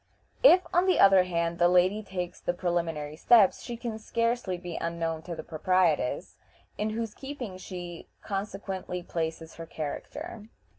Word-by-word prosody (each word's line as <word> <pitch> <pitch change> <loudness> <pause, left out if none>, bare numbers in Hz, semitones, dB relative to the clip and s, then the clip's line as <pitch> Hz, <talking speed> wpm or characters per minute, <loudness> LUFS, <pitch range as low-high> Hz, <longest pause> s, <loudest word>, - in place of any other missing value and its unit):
If, 370 -7 +7
on 355 +2 +3
the 370 - +4
other 195 -2 +7
hand, 170 -1 -1
the 175 - +6
lady 180 +4 +3
takes 180 -3 -5
the 175 - -1
preliminary 165 -4 -2
steps, 205 +3 +5
she 240 - -6
can 230 -2 -5
scarcely 230 -4 -1
be 175 -1 -7
unknown 165 -1 -2
to 170 +1 -6
the - - -7
proprietress, 165 -4 +1 0.4
in 210 +1 -1
whose 225 0 -3
keeping 270 -8 -7
she 175 -2 -8 0.2
consequently 195 -3 -4
places 160 -1 -4
her 165 0 -7
character. 170 +8 -6
180 Hz, 150 wpm, -28 LUFS, 170-215 Hz, 0.4 s, If